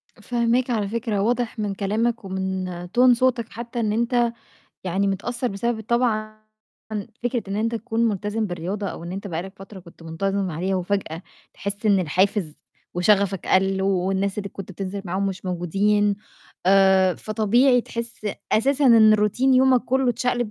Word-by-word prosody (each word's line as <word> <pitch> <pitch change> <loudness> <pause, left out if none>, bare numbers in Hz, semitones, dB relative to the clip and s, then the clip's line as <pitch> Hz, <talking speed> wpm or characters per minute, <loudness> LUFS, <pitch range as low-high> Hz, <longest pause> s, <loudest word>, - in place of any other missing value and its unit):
فاهماك 240 +1 0
على 215 -4 0
فكرة، 220 -1 -2
واضح 240 +1 -1
من 205 -2 -1
كلامك 220 +3 -1
ومن 190 -1 -3 0.2
tone 250 +6 +5
صوتك 240 -2 +1
حتّى 235 +1 -6
إن 215 -2 0
أنت 235 +1 +1 0.5
يعني 190 +2 0
متأثّر 235 +6 -2
بسبب 220 +2 -2
طبعًا 215 -2 0 0.8
فكرة 245 -1 -1
إن 195 - -3
أنت 230 +2 0
تكون 230 0 0
ملتزم 210 +1 -2
بالرياضة 185 +3 -4
أو - - -7
إن 170 - -6
أنت 195 +2 -5
بقى 170 -3 -3
لك 190 +1 -9
فترة 195 +1 -11
كنت 170 -2 -16
منتظم 195 +3 -2
عليها 185 +5 -1
وفجأة 180 -3 -2 0.3
تحس 200 +2 -5
إن 200 -2 +4
الحافز 185 -1 0 0.4
وشَغَفك 195 +1 +2
قَل 190 0 +2
والناس 190 +1 0
اللي 200 -1 -4
كنت 195 0 -9
بتنزل 195 +1 -5
معاهم 190 +2 -1
مش 190 -1 -4
موجودين، 200 +4 +1 0.5
آآ، 190 -1 +5
فطبيعي 235 +4 +2
تحس 235 -2 -6 0.3
أساسًا 275 +5 +3
إن 220 -3 +7
روتين 215 +6 +2
يومك 255 -1 +5
كُلّه 265 0 +1
اتشقلب، 245 -1 -1
205 Hz, 155 wpm, -23 LUFS, 190-235 Hz, 0.8 s, إن